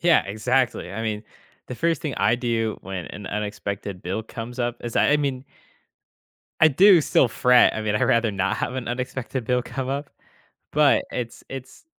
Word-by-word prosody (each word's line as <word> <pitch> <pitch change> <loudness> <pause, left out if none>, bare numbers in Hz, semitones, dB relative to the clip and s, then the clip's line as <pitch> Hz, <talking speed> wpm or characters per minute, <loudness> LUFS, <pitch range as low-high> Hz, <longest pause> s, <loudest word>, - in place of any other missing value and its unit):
Yeah, 170 -1 +4
exactly, 115 -1 0
I 110 +3 -4
mean, 110 -1 -2 0.5
the 125 - -5
first 165 +2 0
thing 150 -7 -3
I 100 +4 +3
do 115 -3 -1
when 95 -2 -5
an 100 -2 -9
unexpected 100 -2 -4
bill 95 +5 -3
comes 120 +3 -8
up 120 0 -1
is 120 -1 -5
that, - - +4
I - - +5
mean 140 -3 -2 1.2
I 160 - +8
do 180 +5 +6
still 135 -3 +3
fret, 125 +2 +4
I 110 - -3
mean, 105 -1 -1
I'd - - +1
rather 115 -1 +3
not 100 -1 -1
have - - -2
an 130 -3 -4
unexpected 125 0 -4
bill 125 +1 +1
come 130 +1 -5
up, 140 +1 -3 0.6
but 150 -1 +4
it's 120 -2 -5
it's, 135 - -9
120 Hz, 185 wpm, -24 LUFS, 105-135 Hz, 1.2 s, I